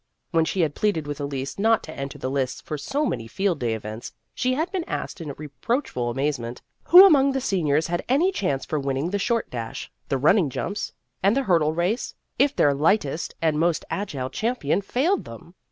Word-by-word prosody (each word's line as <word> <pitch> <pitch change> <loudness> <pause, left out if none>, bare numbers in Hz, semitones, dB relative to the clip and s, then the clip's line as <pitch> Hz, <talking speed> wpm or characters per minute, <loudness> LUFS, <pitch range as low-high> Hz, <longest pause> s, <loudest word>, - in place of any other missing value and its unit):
When 165 -2 +3
she 185 +3 0
had 155 -3 +1
pleaded 170 -6 0
with 145 0 -5
Elise 140 +2 -4
not 225 +2 +3
to 155 - -8
enter 140 0 -6
the 130 - -3
lists 135 -2 -1
for 155 - -5
so 275 - -1
many 115 - -3
Field 185 - -1
Day 115 -2 0
events, 110 +1 -7 0.2
she 255 0 0
had 320 +5 -1
been 375 -4 -2
asked - - -5
in 150 -3 -5
reproachful 145 - -2
amazement 125 -2 -2 0.2
who 365 +3 +10
among 280 -7 +5
the 270 - 0
seniors 160 - +1
had 175 0 -2
any 315 +9 +3
chance 145 - -1
for 155 - -2
winning 135 +4 -2
the 205 - 0
short 230 +3 0
dash, 115 -2 -6 0.2
the 135 - +1
running 155 +4 +4
jumps, 200 +10 -3 0.3
and 200 +6 +3
the 275 - +2
hurdle 165 -8 +2
race, 180 +8 -1 0.2
if 285 +2 +3
their 145 - +4
lightest 155 +1 0
and 155 -2 +2
most 170 0 +1
agile 140 -10 -3
champion 220 - 0
failed 290 - 0
them. 115 +9 -11
165 Hz, 200 wpm, -24 LUFS, 140-225 Hz, 0.3 s, who